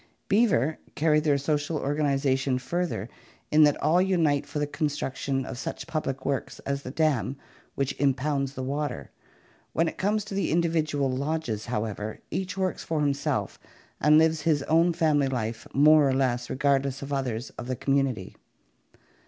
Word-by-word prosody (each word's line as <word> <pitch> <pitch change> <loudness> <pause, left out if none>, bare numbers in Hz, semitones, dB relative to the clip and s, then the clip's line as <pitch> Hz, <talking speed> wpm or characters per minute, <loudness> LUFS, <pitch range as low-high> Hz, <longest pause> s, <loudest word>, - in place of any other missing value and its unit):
Beaver 195 - +2 0.2
carry 155 0 +3
their 150 -2 +2
social 145 +2 -1
organization 140 -2 +1
further 130 - -2 0.4
in 155 - +5
that 145 - +2
all 165 +5 +4
unite 165 -7 +2
for 150 +1 -5
the 145 - +1
construction 140 -3 -2
of 130 - -6
such - - -5
public 135 -4 -3
works 140 -1 -2
as 140 0 -3
the 130 - -7
dam 140 -3 0 0.4
which 140 0 -1
im 140 -2 +3
pounds 140 -1 -2
the 130 - -4
water. 140 0 -3 0.6
When 165 - +2
it - - -5
comes 210 +1 0
to 210 - -7
the 195 - 0
individual 155 -5 +1
lodges, 130 -5 -2
how 115 -2 -1
ever, 105 0 -5
each 190 0 -3
works 190 -1 -1
for 160 -2 -1
himself 140 -1 -1 0.4
and 150 +1 +5
lives 160 -1 +3
his 150 -2 +1
own 165 +4 +3
family 155 -4 +2
life 115 -4 -3
more 150 0 +6
or - - +1
less 125 -2 0
regardless 140 0 0
of 140 +1 -5
others 125 -3 -2
of 120 - -8
the 130 - -1
community. 135 -6 -1
145 Hz, 165 wpm, -27 LUFS, 135-155 Hz, 0.6 s, more